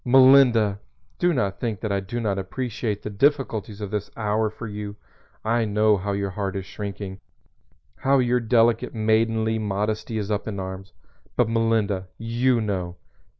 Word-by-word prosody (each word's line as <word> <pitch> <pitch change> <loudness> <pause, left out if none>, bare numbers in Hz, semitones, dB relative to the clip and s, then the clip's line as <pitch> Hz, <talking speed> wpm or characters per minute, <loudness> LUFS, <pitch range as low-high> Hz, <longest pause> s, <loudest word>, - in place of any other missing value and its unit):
Melinda! 125 -5 +6 0.4
Do 175 0 +3
not 100 - -1
think 110 -5 -3
that 110 - -2
I 100 - +1
do 100 +5 -4
not 100 -4 -1
appreciate 110 +1 -3
the 105 - -4
difficulties 110 -4 0
of 100 -1 -4
this 105 -2 -3
hour 110 0 +1
for 110 +2 -8
you. 105 -1 -6 0.5
I 115 +1 +2
know 105 0 +3
how 100 +1 -2
your 100 -1 -2
heart 100 0 -3
is 95 -1 -3
shrinking, 100 -1 -6 0.8
how 140 +1 +3
your 125 -1 +2
delicate 115 0 +2
maidenly 110 0 +2
modesty 105 +2 -2
is 105 0 -3
up 105 +1 -1
in 100 -3 -4
arms. 95 +1 -6 0.4
But 125 -3 +2
Melinda, 110 -4 +1
you 120 +2 +1
know! 95 -5 -2
110 Hz, 160 wpm, -24 LUFS, 100-115 Hz, 0.8 s, Melinda